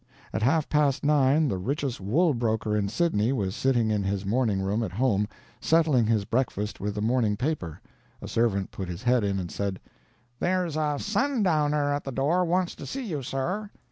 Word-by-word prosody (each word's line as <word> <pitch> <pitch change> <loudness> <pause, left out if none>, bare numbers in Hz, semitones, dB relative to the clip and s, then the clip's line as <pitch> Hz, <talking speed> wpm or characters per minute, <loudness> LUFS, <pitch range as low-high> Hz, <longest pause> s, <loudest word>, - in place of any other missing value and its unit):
At - - -1
half 150 +6 +2
past 145 -3 +1
nine 145 +1 +4
the 95 -8 -1
richest 135 +2 -2
wool 150 - +2
broker 110 -3 0
in 100 -1 0
Sydney 120 - +1
was 100 -8 -1
sitting 120 -5 +1
in 105 -1 +1
his 95 0 -2
morning 110 -1 +1
room 100 +4 0
at 95 -6 -3
home, 105 -2 +1 0.3
settling 155 -8 +3
his 110 -3 +1
breakfast 110 -3 -1
with 105 +1 -3
the 105 - -2
morning 110 -3 +1
paper. 125 - -3 0.4
A - - -8
servant 105 -5 0
put 95 -2 -6
his 90 +2 -6
head 125 -2 +3
in 100 -1 0
and 90 -3 -4
said: 100 -2 -3 0.6
"There's 180 -3 0
a 150 -2 0
sundowner 165 - +1
at 145 - -2
the 135 - -5
door 150 +8 +1
wants 180 +1 0
to - - -8
see 270 -1 -4
you, 155 -9 -3
sir." 175 - -3
125 Hz, 190 wpm, -27 LUFS, 105-150 Hz, 0.6 s, nine